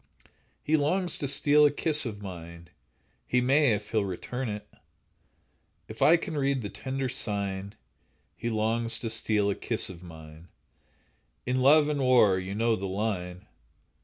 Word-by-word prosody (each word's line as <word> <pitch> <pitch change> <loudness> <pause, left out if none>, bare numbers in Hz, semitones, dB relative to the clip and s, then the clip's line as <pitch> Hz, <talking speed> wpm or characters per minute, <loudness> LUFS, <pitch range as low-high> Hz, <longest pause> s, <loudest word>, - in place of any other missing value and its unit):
He 155 +1 +2
longs 175 +4 +2
to 140 - -2
steal 145 +2 +4
a 150 - +6
kiss 150 -1 0
of 105 -2 -7
mine— 85 -3 -9 0.6
He 125 - +2
may, 135 0 +3
if 105 0 -5
he'll 110 -2 +1
return 115 +6 -4
it! 105 0 -6 1.2
If - - -11
I 165 +3 +6
can 170 -1 -6
read 135 -3 0
the 100 - -4
tender 130 +6 -4
sign, 100 -5 -3 0.6
He 120 - -4
longs 115 +1 -1
to 115 - -3
steal 105 -2 +1
a - - -2
kiss - - -1
of 85 -2 -12
mine; 80 -1 -13 1.0
"In 125 +1 0
love 145 +3 +5
and 150 -2 -1
war"—you 100 -7 +3
know 115 +1 +1
the 100 -1 -5
line. 95 -3 -4
115 Hz, 155 wpm, -27 LUFS, 100-135 Hz, 1.2 s, a